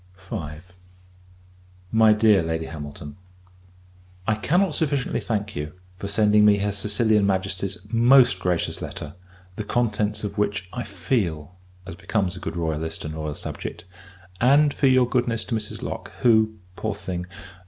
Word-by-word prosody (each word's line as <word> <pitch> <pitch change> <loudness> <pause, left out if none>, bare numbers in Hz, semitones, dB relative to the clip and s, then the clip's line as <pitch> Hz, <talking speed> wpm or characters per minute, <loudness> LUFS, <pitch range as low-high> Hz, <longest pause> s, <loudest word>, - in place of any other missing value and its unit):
V. 95 -6 -6 1.3
MY 110 -1 +6
DEAR 105 -3 +4
LADY 80 0 -2
HAMILTON, 75 -2 -8 1.1
I 110 - +2
cannot 165 - +1
sufficiently 145 -4 0
thank 105 -2 -3
you, 75 +1 -4 0.2
for 100 - -5
sending 105 +1 +4
me 105 -1 +6
her 100 +1 0
Sicilian 105 +1 +2
Majesty's 95 -1 -2
most 120 -3 +6
gracious 90 -2 -1
letter; 75 0 -6 0.4
the 110 - -2
contents 105 -2 0
of 100 0 -4
which 100 -3 -1
I 125 - -3
feel, 90 - -2 0.3
as 95 - -7
becomes 95 +1 -1
a - - -7
good 80 0 -5
royalist, 80 -1 -2
and 80 - -4
loyal 75 -2 -4
subject: - - -6 0.5
and 140 +4 +5
for 140 - +2
your 130 -1 +5
goodness 120 -2 0
to - - -4
Mrs. 105 -1 -4
Lock; - - -5
who, 110 -2 +4 0.2
poor - - -3
thing! 90 -1 -5
105 Hz, 145 wpm, -24 LUFS, 90-115 Hz, 1.3 s, MY